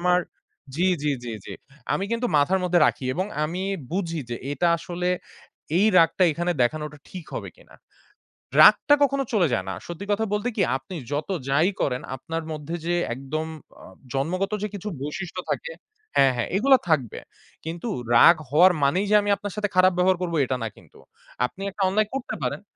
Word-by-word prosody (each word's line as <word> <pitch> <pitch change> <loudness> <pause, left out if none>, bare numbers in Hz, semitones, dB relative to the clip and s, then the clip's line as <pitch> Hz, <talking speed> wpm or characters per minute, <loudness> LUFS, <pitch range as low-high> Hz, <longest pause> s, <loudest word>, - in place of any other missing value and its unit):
আমার 180 0 +3 0.6
জি, 180 - +2 0.2
জি, 150 - +1
জি, 120 - -5
জি। - - -8 0.4
আমি 195 - -1
কিন্তু 230 +1 0
মাথার 180 +7 +3
মধ্যে 175 -1 +3
রাখি 130 - -1
এবং 185 +4 -1 0.2
আমি 175 +5 -3 0.3
বুঝি 165 -4 -2
যে 120 - -2 0.2
এটা 170 +5 +1
আসলে 180 0 -3 0.7
এই 205 - +4
রাগটা 165 +3 +3
এখানে 175 +3 -1
দেখানোটা 150 +4 -2
ঠিক 180 -3 -8
হবে - - -5
কিনা। - - -19 0.9
রাগটা 290 - +7
কখনো 275 0 +1
চলে 190 -6 +3
যায় 95 -5 -1
না। 95 - -2
সত্যি 175 +3 -6
কথা 215 +2 +1
বলতে 210 +4 0
কি? - - 0 0.2
আপনি 135 +8 -10 0.2
যত 145 +4 -2 0.2
যাই 155 +7 +3
করেন 125 -2 0
আপনার 165 +5 -5
মধ্যে 155 +2 -5
যে 175 +1 +1 0.2
একদম 135 +5 -4 0.4
আ - - -12 0.3
জন্মগত 185 +9 -1
যে 210 - 0
কিছু 200 +1 -7
বৈশিষ্ট্য 180 +5 -5
থাকে - - -3 0.4
হ্যাঁ, 135 -1 +5
হ্যাঁ 120 - -2
এগুলো 270 +5 +6
থাকবে। 135 -8 0 0.5
কিন্তু 170 +7 -5 0.3
রাগ 170 +8 +8
হওয়ার 175 +6 +6
মানেই 180 +9 +2
যে 210 - +6
আমি 205 - -3
আপনার 205 -1 -6
সাথে 210 -1 -1
খারাপ 185 0 +6
ব্যবহার 185 0 +3
করব 175 -2 -2
এটা 130 0 -2
না - - -1
কিন্তু। - - -19 0.5
আপনি 185 - -8
একটা 195 - -8
অন্যায় 215 +2 +1
করতে 270 - -4
পারেন। - - -2
175 Hz, 180 wpm, -24 LUFS, 150-195 Hz, 0.9 s, রাগ